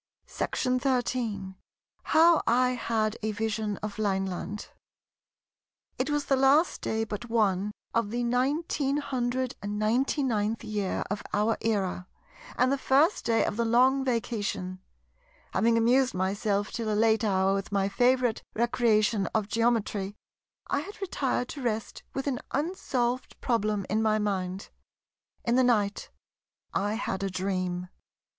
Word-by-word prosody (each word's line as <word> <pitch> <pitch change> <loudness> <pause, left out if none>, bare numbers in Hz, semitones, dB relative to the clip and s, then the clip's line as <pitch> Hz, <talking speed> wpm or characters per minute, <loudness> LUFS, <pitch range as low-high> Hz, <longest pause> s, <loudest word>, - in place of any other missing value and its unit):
§ 255 - -2
13 235 -7 -1 0.5
How 330 +1 +5
I 250 +2 +4
had 225 -3 -1
a 220 0 -1
Vision 215 -1 -2
of 210 0 -5
Lineland 195 0 -2 1.3
It - - 0
was 295 -1 0
the 275 - +3
last 275 +6 +3
day 220 0 -1
but 225 +2 -6
one 205 -3 +1 0.2
of 230 -3 +1
the 240 +2 -2
1999th 250 - 0
year 210 -3 -2
of 205 - -2
our 215 +2 +2
era, 195 -5 -1 0.5
and 255 +1 +3
the 275 - 0
first 285 +9 +3
day 225 -1 +3
of 205 - -3
the 235 - +2
Long 255 +4 +4
Vacation. 215 -7 -2 0.7
Having 230 +1 +3
amused 245 +1 +3
myself 200 +2 0
till 225 -2 -2
a 210 - +1
late 220 0 +3
hour 195 -2 +2
with 195 0 -3
my 195 -1 +1
favourite 245 +3 +2
recreation 220 -3 +2
of 215 -2 +1
Geometry, 215 -3 0 0.5
I 280 - 0
had 395 +8 -8
retired 275 -10 -1
to 285 - -6
rest 225 -3 -3
with 270 - -2
an 265 -4 -1
unsolved 260 -6 -1
problem 215 -5 0
in 215 +2 +1
my 215 -1 +2
mind. 195 -2 -2 0.8
In 235 +1 +2
the 260 - +5
night 210 -5 +1 0.6
I 205 +2 0
had 195 -4 -3
a 195 - -1
dream. 185 -1 -2
225 Hz, 135 wpm, -28 LUFS, 205-255 Hz, 1.3 s, How